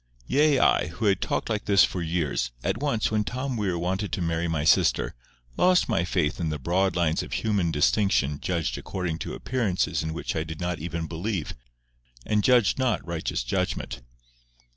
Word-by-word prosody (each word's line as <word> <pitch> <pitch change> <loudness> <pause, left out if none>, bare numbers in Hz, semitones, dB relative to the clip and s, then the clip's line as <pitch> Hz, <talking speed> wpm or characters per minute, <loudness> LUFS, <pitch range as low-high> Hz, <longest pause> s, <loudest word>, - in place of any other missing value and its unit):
Yea 145 - +3
I, 90 - +3
who 85 +7 -4
had 100 -2 +2
talked - - -1
like 105 -2 -2
this 100 -2 +5
for 90 - 0
years, 80 -6 -1
at 95 +4 -1
once, 140 -7 0
when 105 -1 +1
Tom 130 +4 -3
Weir 100 -5 -1
wanted 95 +4 -2
to - - -1
marry 85 0 -1
my 80 -3 -1
sister, 80 - +3 0.4
lost 180 0 +4
my 85 - +1
faith 85 -4 0
in 85 -3 -1
the 75 - -2
broad 90 +6 0
lines 85 -2 +1
of 60 - -7
human 95 - 0
distinction 75 -2 +2
judged 85 -3 -2
according 85 -4 -4
to - - -5
appearances 115 -8 -1
in 80 0 -3
which 80 - -4
I 80 - 0
did 80 -1 -8
not 90 -1 -2
even 85 +1 -4
believe, 85 +1 -3 0.7
and 105 -1 +1
judged 125 -3 +4
not 130 -5 0
righteous 85 -7 -2
judgment. - - -2
90 Hz, 185 wpm, -26 LUFS, 80-105 Hz, 0.7 s, this